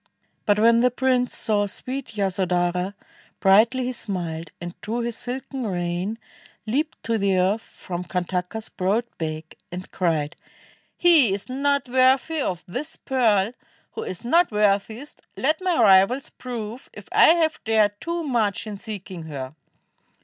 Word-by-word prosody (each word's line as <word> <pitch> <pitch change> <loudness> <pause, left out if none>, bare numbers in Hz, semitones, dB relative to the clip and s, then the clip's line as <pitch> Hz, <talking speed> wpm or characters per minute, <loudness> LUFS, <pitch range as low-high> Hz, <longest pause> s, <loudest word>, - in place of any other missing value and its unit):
But 205 -1 +4
when 230 +2 +5
the 250 - +5
prince 250 0 +1
saw 205 -2 +1
sweet 255 +3 -5
Yasodhara, 180 -1 0 0.4
Brightly 225 +7 +4
he 250 - -1
smiled, 170 -8 -4
and 175 0 -6
drew 230 +3 -2
his 235 -1 -3
silken 255 0 -4
rein, 175 +3 -2 0.5
Leaped 285 +8 -1
to 230 -1 0
the 195 -1 +2
earth 190 +5 +2
from 180 -4 -7
Kantaka's 180 +4 -3
broad 200 +6 0 0.2
back, 155 0 -4 0.2
And 180 +1 -7
cried, 160 -4 0 0.6
"He 320 - +5
is 200 - -7
not 280 +1 0
worthy 260 +5 +3
of 180 -8 -2
this 255 +12 -5
pearl 225 -6 +2 0.4
Who - - -6
is 185 +4 -6
not 340 +8 +4
worthiest; 210 +6 0 0.2
let 310 +6 +1
my 365 -6 +1
rivals 205 +5 +5
prove 240 -1 -7
If - - -11
I - - +7
have 320 -2 0
dared 215 -2 +2
too 340 0 -2
much 230 -9 0
in 210 -2 -6
seeking 190 -6 -7
her." 135 -3 -6
215 Hz, 145 wpm, -24 LUFS, 185-255 Hz, 0.6 s, I